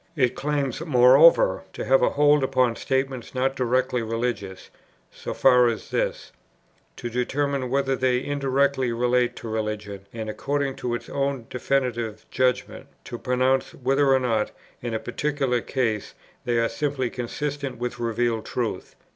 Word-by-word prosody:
It 130 -5 +2
claims, 145 -2 -2
moreover, 145 - +6
to - - -5
have - - +4
a - - +4
hold 145 -1 +4
upon 130 -3 +2
statements 130 -1 -2
not 135 +1 0
directly 125 -1 +1
religious, 115 -4 -4 0.4
so - - -7
far 125 -2 +5
as 115 -2 -3
this, - - -2 0.6
to 120 - -6
determine 130 +2 -1
whether 135 0 +1
they 130 0 +1
indirectly 140 -2 +1
relate 120 +1 +1
to - - -8
religion, 105 -3 -4
and, 110 -1 -6
according 140 +4 -2
to 120 -1 -2
its - - -7
own 140 -3 -2
definitive 120 -4 -1
judgment, 130 -1 -1 0.2
to 120 - -7
pronounce 130 +1 +1
whether 135 +2 +2
or 135 - +5
not, 115 -4 0 0.3
in 120 -2 -3
a - - -1
particular 135 0 -1
case, 110 -6 -2 0.3
they 120 -1 +1
are 115 0 +2
simply 130 0 -2
consistent 140 +1 -4
with 120 0 -4
revealed 115 -1 0
truth. 120 -3 -3
125 Hz, 145 wpm, -24 LUFS, 120-135 Hz, 0.6 s, moreover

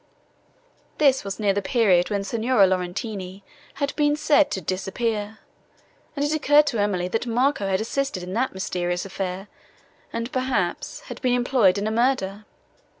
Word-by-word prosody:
This 275 -3 +3
was 195 +1 -5
near 205 -2 +2
the 205 - -1
period, 190 -4 +3
when 200 -2 -1
Signora 225 +1 +3
Laurentini 185 +1 -3 0.3
had 280 0 -2
been 295 -1 +2
said 300 -1 +3
to 190 - -2
disappear, 205 +4 -3 0.8
and 285 0 0
it 295 - 0
occurred 295 -1 +4
to 235 -7 -1
Emily, 185 -3 0
that 225 +5 -2
Marco 240 -2 +1
had 190 -1 +1
assisted 235 -4 -2
in 180 +1 -6
that 255 +5 0
mysterious 175 -1 -2
affair, 190 0 -4 0.6
and, 230 +2 -4
perhaps, 255 - -2
had - - -9
been 250 -2 +2
employed 245 -6 +3
in 200 - -2
a 215 - 0
murder! 220 -4 0
215 Hz, 155 wpm, -24 LUFS, 190-260 Hz, 0.8 s, occurred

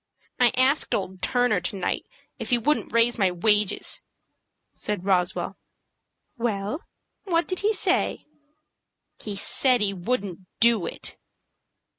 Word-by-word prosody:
"I 245 -1 +5
asked 265 +4 +3
old 190 -1 -4
Turner 245 -7 +2
to 180 - -4
night 185 - -2 0.3
if - - -5
he 245 - +4
wouldn't 295 +6 0
raise 230 +1 +3
my 190 -2 +4
wages," 205 +3 +2 0.7
said 205 -3 -4
Roswell. 180 -3 0 0.8
"Well, 220 - -2 0.4
what 340 -3 +1
did 370 - -2
he 420 +2 +2
say?" 435 - 0 0.9
"He 210 -2 -5
said 250 +5 +2
he 205 -2 +1
wouldn't 195 -1 -3 0.2
do 230 -5 +4
it." - - -7
215 Hz, 125 wpm, -25 LUFS, 195-250 Hz, 0.9 s, I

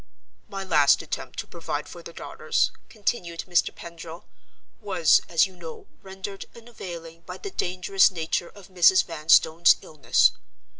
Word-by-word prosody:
"My 195 -1 -5
last 150 -7 +4
attempt - - -6
to - - -4
provide - - -5
for - - -11
the - - -10
daughters," - - -1 0.2
continued 190 -6 -3
Mr. 175 -1 +2
Pendril, 170 0 -10 0.6
"was, 190 -6 +3
as 165 +1 +4
you 190 -1 -11
know, 165 -2 -10 0.2
rendered 195 +1 -8
unavailing 175 -8 -10
by 180 0 -7
the 400 - -8
dangerous 185 - +2
nature 170 0 -3
of 200 -3 -15
Mrs. 185 0 +5
Vanstone's 165 +1 +4
illness. 145 -7 +2
175 Hz, 140 wpm, -25 LUFS, 165-195 Hz, 0.6 s, Mrs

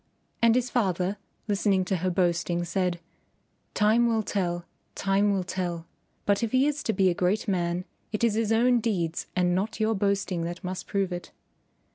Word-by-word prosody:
And 230 0 +5
his 250 0 0
father, 190 -4 0 0.3
listening 200 -2 +2
to 190 0 0
her 185 +2 0
boasting, 175 -1 +1
said, 180 -1 -1 0.8
"Time 220 +3 +4
will 225 -2 +1
tell; 175 -4 -2 0.3
time 200 +1 +2
will 195 -2 0
tell; 175 -2 -3 0.4
but 200 -1 +2
if 230 0 -2
he 260 +1 +4
is 295 0 0
to - - 0
be 190 -2 +3
a - - +1
great 180 +4 0
man 175 -2 0 0.3
it 215 +1 -2
is 230 -3 +4
his 225 0 0
own 240 +2 +4
deeds 180 -8 -1
and 180 -1 +2
not 210 +6 -1
your 220 +1 +2
boasting 200 -3 0
that 175 +3 -5
must 185 0 -5
prove 195 -3 -1
it." 175 - -6
195 Hz, 180 wpm, -27 LUFS, 180-220 Hz, 0.8 s, And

